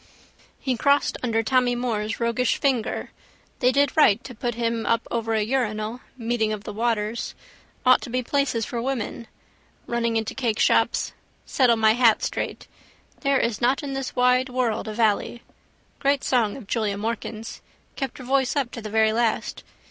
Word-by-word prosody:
He 260 -2 -1
crossed 280 +4 +2
under 225 -2 0
Tommy 250 0 +2
Moore's 225 -3 -2
roguish 235 +1 +1
finger. 260 -6 -1 0.5
They 250 0 +4
did 280 +1 +2
right 245 -7 +5
to 255 - -8
put 240 0 -3
him 230 -1 -1
up 230 0 0
over 225 -1 -1
a 215 - +2
urinal: 220 -1 -1 0.2
meeting 230 -2 0
of 210 -1 -4
the 210 - -6
waters. 225 0 -1 0.5
Ought 255 0 +6
to - - -7
be 255 +1 -1
places 255 -4 0
for 235 - -4
women. 245 -2 -3 0.6
Running 235 -1 -1
into 220 -1 -2
cakeshops. 235 -4 +1 0.3
Settle 250 -3 +3
my 220 -1 +4
hat 230 -2 +4
straight. - - -3 0.5
There 275 -2 +2
is 230 -3 -1
not 255 +4 +2
in 275 -1 -4
this 270 -1 -4
wide 250 +1 +3
world 245 -4 -1
a 215 - -4
vallee. 230 +1 +1 0.6
Great 280 0 +1
song 235 -4 +1
of 265 - -10
Julia 210 -1 -1
Morkan's. 225 +1 -5 0.3
Kept 270 -3 -4
her 260 - -9
voice 265 +1 +1
up 270 -4 0
to 230 - -7
the 215 - -6
very 220 0 +3
last. 230 -1 -1
235 Hz, 170 wpm, -24 LUFS, 220-255 Hz, 0.6 s, Ought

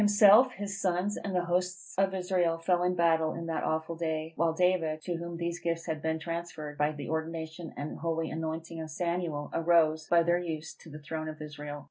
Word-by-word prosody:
Himself, 210 +4 +7
his 200 0 -5
sons, 185 +2 +1
and 195 -2 -4
the 180 -1 +1
hosts 180 +1 -1
of 195 0 +2
Israel, 180 -3 +1
fell 175 +1 +1
in 180 0 +2
battle 165 -2 +3
in 170 - -5
that 165 -1 -2
awful 160 +1 -1
day; 160 -1 -2
while 170 -1 +2
David, 165 -2 +2
to 175 - -2
whom 170 0 -5
these 170 0 -2
gifts 165 -1 -2
had 160 -2 -3
been 160 0 0
transferred 165 -2 -5
by 150 +1 +2
the 145 -2 -7
ordination 160 +1 -4
and 145 +1 -5
holy 165 -1 -1
anointing 160 +1 -4
of 160 - -6
Samuel, 170 -2 -2
arose 160 -2 +3
by 170 -1 +5
their 175 +1 +3
use 160 -3 -4
to 165 - -15
the 150 - -8
throne 155 +1 -5
of 155 - -8
Israel. 150 -1 -6
165 Hz, 205 wpm, -30 LUFS, 160-175 Hz, -, Himself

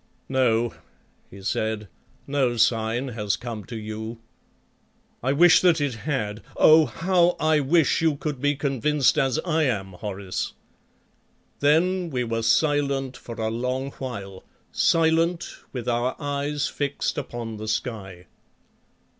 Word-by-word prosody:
"No," 120 -3 +2 0.6
he 95 0 -12
said, 110 +1 -2 0.4
"no 135 -4 0
sign 115 +3 +1
has 105 -3 -1
come 115 -3 -6
to 120 - -8
you. 110 +1 -6 1.0
I 130 - +1
wish 165 +3 +6
that 175 -3 +4
it 145 -3 0
had. 110 -4 -3 0.2
Oh! 155 -1 +7
how 175 +7 +2
I 155 -1 +3
wish 150 +2 +3
you 160 -2 +2
could 145 -2 -4
be 145 0 +2
convinced 140 +1 +1
as 135 -3 +1
I 160 -2 +2
am, 100 -7 -1
Horace!" 95 0 -4 1.1
Then 170 +5 +2
we 125 -4 -1
were 115 -1 -2
silent 140 +2 +1
for 115 - -9
a 110 -1 -2
long 130 +4 -2
while, 100 -7 -6 0.3
silent, 165 +1 +2 0.2
with 125 -4 -6
our 120 +1 0
eyes 145 0 -2
fixed 145 0 -2
upon 120 -5 -6
the 110 +1 -6
sky. 100 -6 -4
130 Hz, 130 wpm, -24 LUFS, 110-150 Hz, 1.1 s, Oh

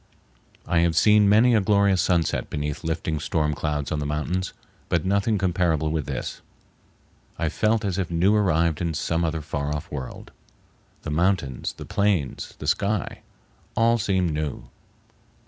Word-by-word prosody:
I 85 - +2
have 85 -1 +2
seen 105 -1 +5
many 115 +4 +5
a 110 - +4
glorious 100 -2 +3
sunset 85 -3 0
beneath 75 -1 -4
lifting 80 -1 -2
storm 75 0 0
clouds 75 -1 -2
on 75 - -1
the 75 - -3
mountains, 80 +5 -2 0.4
but 85 +1 +1
nothing 100 +3 +1
comparable 85 -5 +1
with 80 -2 -2
this. - - -4 1.0
I 80 - 0
felt 110 +5 +1
as 95 -1 -1
if 95 - -2
new 85 +4 +3
arrived 85 -6 +2
in 85 -2 -1
some 85 +2 -1
other 80 -1 -1
far 75 -1 -3
off 75 +2 -7
world. 65 -4 -7 0.7
The 80 - -4
mountains, 85 -5 0
the - - -9
plains, 100 -9 -1
the - - -8
sky, 100 -1 0 0.6
all 115 0 +3
seemed 95 -5 +1
new. 75 -2 -4
85 Hz, 155 wpm, -24 LUFS, 75-100 Hz, 1.0 s, seen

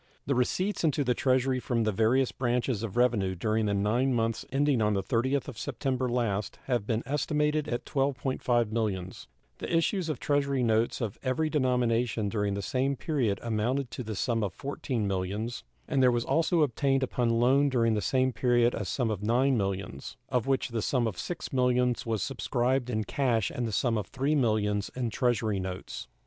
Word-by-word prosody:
The 140 - +1
receipts 180 +12 0
into 150 -2 +2
the 125 -2 +2
Treasury 130 +1 +1
from 120 -2 0
the 110 - +1
various 115 +6 +2
branches 120 -3 -1
of 115 -3 -5
revenue 110 -7 +2
during 110 +3 0
the 100 - +1
nine 120 +6 +1
months 115 -1 0
ending 140 -2 +2
on 105 -1 +2
the 95 - 0
30th 130 +7 0
of 130 -5 -7
September 130 -2 -2
last 110 -5 -1
have 120 -5 -1
been 115 0 0
estimated 150 +2 0
at 120 - -3
$12.5 130 -4 0
millions; 100 -5 -3 0.3
the - - -5
issues 165 +1 +1
of 150 -5 -2
Treasury 140 -1 +1
notes 115 +2 +1
of 110 -4 -3
every 155 +4 0
denomination 120 -5 +1
during 105 -2 -1
the 100 - -4
same 135 +6 0
period 130 - -1
amounted 120 +3 -1
to - - -5
the 110 -3 -5
sum 115 +2 0
of 95 -3 -4
$14 135 -3 -3
millions, 100 +4 -2 0.2
and 140 -3 +1
there 130 - +6
was 120 -1 0
also 165 0 +2
obtained 135 0 +1
upon 125 -2 0
loan 135 +4 +4
during 115 -4 +2
the 105 - 0
same 130 +2 +1
period 120 -1 +3
a 105 - -3
sum 115 +5 -1
of 105 - -2
$9 125 +5 +2
millions, 95 - -3
of 125 -1 0
which 135 -2 +1
the 115 -2 -2
sum 125 +2 +1
of 110 -4 -2
$6 165 - -5
millions 125 -2 +1
was 110 -4 0
subscribed 125 -1 0
in 110 -3 0
cash 115 -2 0
and 120 -1 -2
the - - -4
sum 115 +1 +1
of 100 - -7
$3 140 +3 0
millions 105 -6 +1
in 125 -3 -2
Treasury 115 -5 0
notes. 95 0 -6
120 Hz, 190 wpm, -29 LUFS, 110-135 Hz, 0.3 s, there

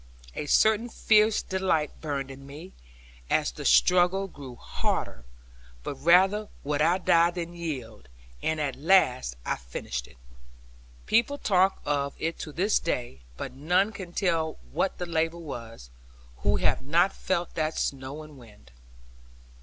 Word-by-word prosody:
A 150 - -5
certain 220 +8 +3
fierce 215 -1 +3
delight 185 -6 -1
burned 140 -3 -3
in 135 +1 -11
me, 155 +7 -10 0.6
as - - +2
the - - -8
struggle 180 +2 +4
grew 140 -8 -10
harder; - - -3 0.6
but - - -3
rather 185 +9 +4
would 145 +1 -1
I 170 +4 +4
die 170 -2 +4
than 175 -1 -5
yield; 130 - -6 0.3
and 160 0 -1
at 140 -4 -1
last 130 - +3
I - - -1
finished - - -5
it. - - -19 0.9
People 235 +6 +2
talk 190 -5 +2
of 140 -1 -1
it 165 +1 -3
to 155 - -6
this 195 +7 +2
day; 120 - -3 0.2
but - - -6
none 180 +9 +1
can 190 -5 -8
tell 165 -4 0
what 190 - -1
the 180 - -3
labour 165 0 0
was, 115 - -9 0.5
who - - +1
have - - +1
not 170 +8 +2
felt 175 -2 -2
that 155 0 -1
snow 135 +3 -3
and 150 -3 -13
wind. 105 - -17
160 Hz, 145 wpm, -27 LUFS, 135-185 Hz, 0.9 s, struggle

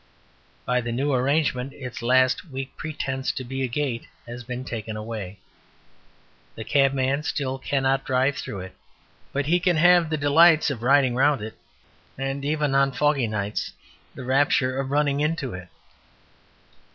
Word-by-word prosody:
By 125 +1 +1
the 120 0 -4
new 135 +4 0
arrangement 130 0 0
its 125 -4 -8
last 130 +7 +2
weak 135 0 -6
pretence 135 -4 -3
to 130 - -5
be 135 +2 -5
a 130 - +1
gate 125 -1 -3 0.2
has 120 +1 -8
been 125 +1 -6
taken 110 -3 -5
away. 105 -3 -6 1.2
The 110 - -6
cabman 135 +1 +2
still 135 -3 -3
cannot 135 0 0
drive 130 +2 +1
through 100 -7 -5
it, 95 0 -10 0.6
but 140 0 -1
he 175 +4 +3
can 180 -2 +2
have 175 0 +5
the 155 - -1
delights 155 +2 +5
of 120 -5 -5
riding 130 0 +4
round 135 -2 +2
it, 110 - -6 0.6
and 135 +1 -3
even 150 -1 0
(on 135 0 +3
foggy 145 -4 +1
nights) 105 -1 -3 0.4
the - - -7
rapture 130 -1 +2
of 135 -1 -3
running 145 0 +1
into 150 -4 -1
it. 90 0 -8
135 Hz, 155 wpm, -24 LUFS, 125-145 Hz, 1.2 s, have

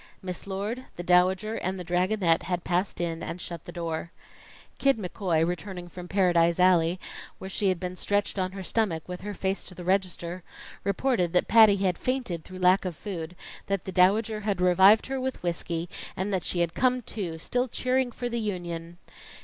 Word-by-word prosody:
Miss 180 0 -5
Lord, 210 +6 -3
the 175 - -5
Dowager 185 +4 +3
and 185 +1 -3
the - - -4
Dragonette 180 -1 +2
had 180 -1 -2
passed 180 +1 -1
in 170 -1 -2
and 175 - -5
shut 170 -2 -7
the - - -8
door. 170 -1 -4 0.7
Kid 275 -3 +3
McCoy, 180 -4 0
returning 180 +1 -4
from 180 +1 -9
Paradise 175 -3 +3
Alley, 180 -1 +4 0.4
where 190 - -7
she 200 0 +1
had 185 -2 0
been 180 0 -4
stretched 205 +1 0
on 185 0 -1
her 195 -1 -6
stomach 185 -5 -1
with 180 0 -6
her 205 +1 -5
face 190 +1 -1
to 180 - -10
the 180 - -8
register, 180 -1 -1 0.4
reported 200 -3 +1
that 180 - +3
Patty 220 -2 +7
had 185 -3 0
fainted 245 -11 -2
through 185 - -10
lack 185 +1 +4
of 180 -3 -4
food, 175 -4 -6 0.3
that 195 -2 -1
the 190 - -4
Dowager 210 +4 +3
had 205 -3 -1
revived 190 +4 +6
her 265 0 -3
with 260 -5 -3
whiskey, 170 -1 -2 0.3
and 195 +2 -1
that 185 -2 0
she 175 - -1
had 170 -1 0
come 255 -1 +2
to, 185 -7 -4
still 245 +10 -1
cheering 255 +1 0
for 245 +1 -4
the 235 0 -2
Union. 175 -5 -4
185 Hz, 190 wpm, -27 LUFS, 175-205 Hz, 0.7 s, Patty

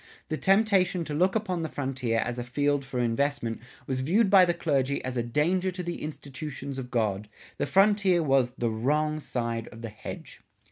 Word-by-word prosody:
The 155 - -1
temptation 195 -3 +3
to 150 - -5
look 185 +6 +2
upon 190 -6 -1
the 160 - -3
frontier 130 -4 -2
as 120 0 -3
a - - -2
field 145 +3 0
for 135 -2 -4
investment 120 -1 0 0.2
was 130 -1 -2
viewed 195 - +2
by 190 -2 +8
the 175 - +1
clergy 140 -5 0
as 130 -1 -3
a 120 - +1
danger 160 +10 +1
to 180 0 -5
the 175 0 -4
"institutions 140 -2 -6
of 125 -1 -6
God." 105 -4 -1 0.3
The - - 0
frontier 195 +1 +4
was 135 -4 +3
"the 120 -2 0
Wrong 150 +7 0
side 115 -5 -3
of 115 +1 -11
the 115 - -4
Hedge." 105 - -9
145 Hz, 190 wpm, -27 LUFS, 125-175 Hz, 0.3 s, by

